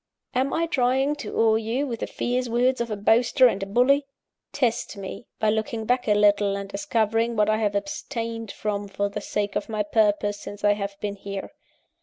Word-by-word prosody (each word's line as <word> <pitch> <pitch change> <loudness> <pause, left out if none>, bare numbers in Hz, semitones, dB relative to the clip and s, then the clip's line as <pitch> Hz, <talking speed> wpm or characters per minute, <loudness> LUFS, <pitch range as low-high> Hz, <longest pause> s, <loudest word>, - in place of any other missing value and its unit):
"Am 260 +2 +1
I 335 - +1
trying 270 -1 +1
to 230 -8 -6
awe 220 -1 +4
you 230 +6 -1
with 235 -5 -4
the - - -3
fierce 250 0 -2
words 245 +2 +2
of 235 - -2
a 210 - -2
boaster 235 +5 +4
and 200 -5 +3
a 195 - -3
bully? 275 +7 +3 0.4
Test 235 -5 -1
me, 200 +4 -7
by 215 -1 +2
looking 220 +1 -2
back 250 +1 +1
a 210 - +4
little, 205 -1 +3
and 200 0 -5
discovering 230 -2 0
what 210 0 +3
I 215 - +2
have 210 -2 0
abstained 230 -3 -4
from 205 -1 -3
for 200 +1 -2
the 200 - -5
sake 205 -1 -2
of - - -2
my 215 -1 0
purpose, 205 -1 +1
since 205 0 -9
I 205 0 +5
have 200 -1 -5
been 205 -1 -3
here. 195 0 -6
220 Hz, 205 wpm, -25 LUFS, 205-245 Hz, 0.4 s, I